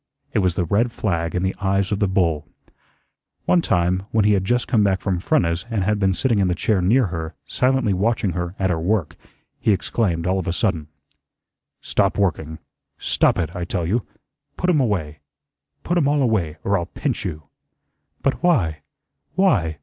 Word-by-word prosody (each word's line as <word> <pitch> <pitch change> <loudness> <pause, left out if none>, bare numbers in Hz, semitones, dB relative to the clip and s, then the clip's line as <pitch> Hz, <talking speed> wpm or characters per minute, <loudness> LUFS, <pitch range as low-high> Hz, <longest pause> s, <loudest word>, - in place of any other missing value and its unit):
It - - +2
was 90 -3 +1
the 90 - 0
red 110 +8 +1
flag 85 -8 -2
in 90 - 0
the 95 - 0
eyes 100 0 +1
of 100 - 0
the 100 - +2
bull. 85 -5 0 1.0
One 180 - +4
time 95 - 0
when 110 -2 +2
he 105 - +4
had 95 -2 +1
just 120 +5 0
come 115 -5 +3
back 95 -2 +2
from 95 -3 -1
Frenna's 85 +2 0
and 110 -5 -1
had 105 +2 +1
been 95 -2 +2
sitting 115 -3 +1
in 95 - +3
the 90 - 0
chair 95 +3 +1
near 115 +8 +3
her, 80 -2 -5
silently 125 -5 +1
watching 105 +1 0
her 85 +1 -4
at 95 -1 +1
her 80 - -1
work, 90 -1 0 0.4
he - - +2
exclaimed 95 -3 0
all 95 +1 +1
of 90 - -4
a 85 - 0
sudden: 85 -6 -1 0.9
"Stop - - 0
working. 80 -5 -1 0.4
Stop - - +2
it, 85 +2 -2
I 90 - -3
tell 85 -1 -2
you. 110 +7 0 0.5
Put 180 - +1
'em 155 - +3
away. 85 - -1 0.6
Put 175 +1 +1
'em 145 - +2
all 145 -1 +2
away, 95 -10 0
or 100 -1 +1
I'll 85 - -4
pinch 135 +5 -3
you." 80 -6 -5 0.8
"But 140 - 0
why 90 - +2 0.5
why?" 105 - +2
95 Hz, 190 wpm, -22 LUFS, 85-110 Hz, 1.0 s, One